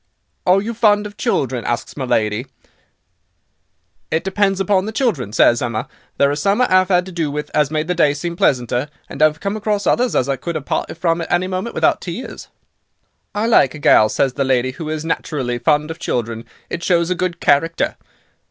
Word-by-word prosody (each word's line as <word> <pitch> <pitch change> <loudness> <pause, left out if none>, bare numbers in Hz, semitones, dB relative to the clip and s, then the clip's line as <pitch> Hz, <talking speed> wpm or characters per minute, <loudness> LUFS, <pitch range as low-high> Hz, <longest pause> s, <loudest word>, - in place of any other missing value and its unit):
"'Are 190 +2 +4
you 230 +2 -3
fond 210 -2 +3
of 205 0 -8
children,' 130 - -1
asks 120 +1 -3
my 135 - -3
lady. 110 +1 0 1.6
"'It 160 +1 0
depends 195 0 +1
upon 195 0 +1
the - - -3
children,' 200 - -1
says 120 +1 +4
Emma; 115 -2 -2 0.3
'there 140 0 +3
are - - -1
some 195 +9 +1
I 250 - +5
'ave 185 +1 +4
'ad 180 0 +3
to 190 - -9
do 165 -4 -2
with 150 +1 -5
as 150 -2 +2
made 155 0 -1
the 180 - +1
day 150 -4 +2
seem 170 +4 -4
pleasanter, 125 -2 +1 0.2
and 140 - -7
I've 155 0 +4
come 200 +3 -2
across 210 -2 -1
others 245 +5 +2
as 130 - +2
I 135 -1 -1
could 170 +5 -4
'ave 150 - -6
parted - - -3
from 170 -1 0
at 165 - -6
any 175 +1 +2
moment 185 +5 -4
without - - +2
tears.' - - -7 0.9
"'I 210 +2 0
like 185 - +4
a - - -6
gal,' 110 -6 +5
says 130 +4 0
the 140 - -1
lady, 130 -1 +1
'who 155 +4 -7
is 155 0 -3
naturally 130 -7 -2
fond 150 +2 +1
of 160 - -8
children, 115 -1 -3 0.2
it 170 - -5
shows 170 -1 +2
a - - +4
good 180 -1 -3
character. 165 +4 +1
160 Hz, 205 wpm, -19 LUFS, 135-190 Hz, 1.6 s, I